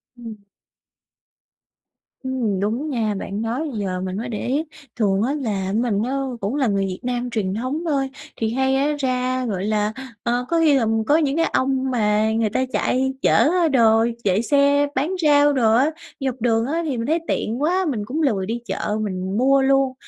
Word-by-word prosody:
Ừm. 230 -3 -9 1.9
Ừm, 240 -7 -1
đúng 230 +10 -1
nha, 225 -6 -1
bạn 200 +2 -4
nói 250 +8 -2
giờ 190 -4 -3
mình 185 0 -4
mới 235 +3 -4
để 220 +1 -4
ý. 280 +5 0 0.3
Thường 200 -4 +1
á 270 +4 0
là 205 -9 -2
mình 220 -2 0
á 250 - -2 0.3
cũng 205 +8 -2
là 275 -4 +1
người 195 -2 +1
Việt 185 -1 -5
Nam 245 0 -2
truyền 210 -5 -2
thống 255 - -3
thôi, 275 -4 0 0.3
thì 225 0 -1
hay 265 +1 +1
á 285 +2 +1
ra, 255 -1 -1
gọi 195 -4 -2
là 210 0 0 0.3
ờ, 245 +1 0
có 335 -1 +2
khi 310 -3 +4
là, 250 - +1
ờ, 220 - 0 0.2
có 295 - +5
những 290 -3 +1
cái 330 - +3
ông 265 0 +1
mà 215 -2 +2
người 225 -1 +1
ta 260 +5 0
chạy 265 +1 +1
chở - - +3 0.3
á 330 - +4
đồ 230 -5 +4 0.2
chạy 195 +1 +2
xe 285 +2 +3
bán 290 +7 0
rau 290 -1 +5
đồ 225 -5 +3
á, 270 +6 +3 0.3
dọc 260 -3 -3
đường 225 -1 +2
á, 320 +6 -1
thì 270 -5 -2
mình 230 - -2
thấy 325 +2 +2
tiện 235 +5 -2
quá, 365 +4 +1
mình 215 -7 -3
cũng 300 +8 -3
lười 210 -10 +1
đi 230 +3 -3
chợ 210 -2 -2
mình 190 -1 -3
mua 270 +2 +4
luôn. 270 -1 +2
245 Hz, 205 wpm, -21 LUFS, 215-275 Hz, 1.9 s, có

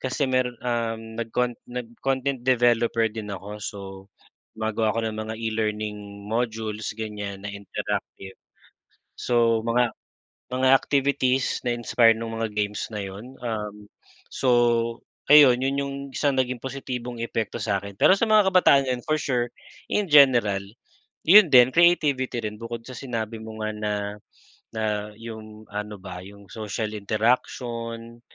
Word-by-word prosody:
kasi 130 +2 -1
meron, 130 -1 +1
um, 115 -2 -1 0.2
nag-cont 120 +1 -1
nag-content 130 +2 -3
developer 120 -2 +3
din 105 -2 -6
ako 95 +2 -9
so, 100 - -5 0.8
bago 110 0 -2
ako 115 +1 0
ng 110 - -3
mga 110 +1 -4
e-learning 105 -2 -3
modules, 110 -1 -2
ganyan, 105 -2 -5
na - - -4
interactive. 100 -1 -5 0.8
So, 115 -2 +2
mga 120 0 +2 0.6
mga 130 +1 +2
activities, 135 -2 +1
na-inspire 120 -1 +4
no'ng 115 0 -5
mga 115 -1 -1
games 105 0 -2
na 105 - -3
'yon, 105 +8 -9
um, 105 -3 -5 0.4
so 130 - -1 0.8
ayun, 135 -5 +8
'yon 135 +1 0
'yong 140 0 -3 0.2
isang 140 -2 +1
naging 130 -1 0
positibong 125 -2 -5
epekto 115 -2 -3
sa'kin. 100 -1 -2
Pero - - +7
sa 230 - +2
mga 210 -3 +5
kabataan 140 -7 +5
ngayon, 125 +1 -2
for 155 0 +2
sure, 120 -3 0 0.4
in 210 - +2
general, 120 -9 +6 0.7
'yon 190 +1 +8
din 125 0 +8
creativity 145 -8 +3
rin, 105 0 -4
bukod 115 0 -6
sa 130 - -8
sinabi 115 -3 -4
mo 110 0 -9
nga 110 - -1
na, 105 0 -2 0.8
na, 110 - -2 0.3
'yong 110 -1 -10
ano 105 0 -5
ba, 90 -1 -8
'yong 100 +1 -14
social 110 0 -4
interaction. 115 +2 -2
115 Hz, 135 wpm, -25 LUFS, 105-130 Hz, 0.8 s, ayun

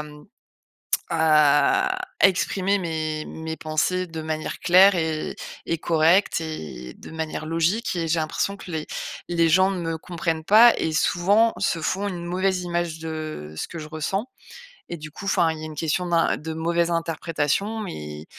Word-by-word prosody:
m 150 0 -10 0.9
à 160 - +4 0.2
exprimer 195 +1 +3
mes 155 -3 -3
mes 160 0 -6
pensées 180 +4 -1
de 160 -1 -7
manière 155 0 -4
claire 190 +3 +6
et 160 -3 -2 0.3
et 165 - -1
correcte 165 +3 +3
et 70 - -7
de - - -11
manière 160 -1 -4
logique 165 +7 0
et 165 -1 -1
j'ai 165 +1 +1
l'impression 200 +5 -2
que 185 - -10
les 155 -2 -3 0.4
les 170 -1 +2
gens 185 +3 +4
ne 190 - -3
me 165 -1 -2
comprennent 165 -2 -3
pas, 225 +6 +7
et 160 - -1
souvent 200 +8 +3
se 185 -3 0
font 195 +5 -1
une 175 -3 -5
mauvaise 185 +1 0
image 170 -2 -2
de 155 - -6
ce - - -4
que 170 - -8
je 155 -1 -7
ressens, 170 - -2 0.6
et 170 - -4
du 155 0 -9
coup, 190 - -10
enfin, 170 -4 +2
il 160 - -7
y - - -8
a - - -4
une 155 - -8
question 160 +4 -1
d'un 170 -1 +2
de 160 +1 -6
mauvaise 170 +1 0
interprétation, 165 +5 -1
mais 75 - -7
165 Hz, 175 wpm, -24 LUFS, 155-185 Hz, 0.9 s, pas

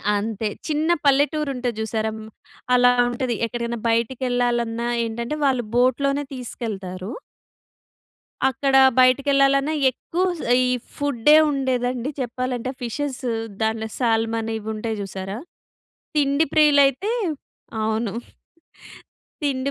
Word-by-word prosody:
అంతే. 215 +1 -2 0.2
చిన్న 310 +2 0 0.2
పల్లెటూరు 290 +2 +2
ఉంటది 245 -2 -2
చూసారా 220 0 -1
హ్మ్. 220 0 -9 0.5
అలా 245 0 +6 0.2
ఉంటది. 245 0 -2
ఎక్కడికైనా 235 0 -4
బయటికెళ్ళాలన్నా 240 -1 0 0.2
ఏంటంటే 235 +6 -4
వాళ్ళు 255 -4 +1
బోట్‌లోనే 275 +3 +2
తీసుకెళ్తారు. 205 -5 -6 1.4
అక్కడ 270 +1 0 0.2
బయటికి 255 +2 +4
వెళ్ళాలన్నా 275 +2 +3 0.2
ఎక్కువ 345 +8 -3 0.2
స్ - - -6 0.2
ఈ - - +2 0.3
ఫుడ్ 285 -3 0 0.2
ఉండేదండి 255 -1 -1
చెప్పాలంటే 255 0 -3
ఫిషెస్ 270 +3 -3 0.4
దాంట్ల 220 0 0
సాల్‌మాన్ 225 -1 0
ఇవి 220 0 -7
ఉంటాయి 220 0 -3
చూసారా! 195 +1 -5 0.8
తిండి 285 +2 +2
ప్రియులు 300 -2 +6
అయితే, 385 - -2 0.7
అవును. 220 -1 -1 1.3
తిండి 275 -1 -1
245 Hz, 105 wpm, -22 LUFS, 225-275 Hz, 1.4 s, అలా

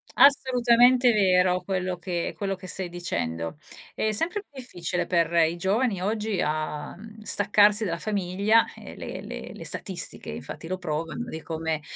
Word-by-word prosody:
Assolutamente 250 -2 +5
vero 180 -3 +3
quello 185 -1 -2
che 175 -1 -3
quello 195 -1 -2
che 185 0 -11
stai 185 -1 -2
dicendo. 85 - -3 0.4
È 215 - 0
sempre 345 - 0
più 285 -9 -14
difficile 175 -7 -3
per 170 -1 +2
i 165 0 +3
giovani 195 +2 0
oggi 210 -1 -1
a 150 -1 -3
mhmm, 220 +1 -12
staccarsi 205 +1 +4
dalla 170 -2 -2
famiglia 205 +2 +2
e - - -11
le - - -6 0.3
le - - -9
statistiche - - -3
infatti 165 - -7
lo 185 +1 -2
provano 165 +7 -4
di 160 - -6
come, 160 -1 -3
185 Hz, 150 wpm, -26 LUFS, 170-220 Hz, 0.4 s, Assolutamente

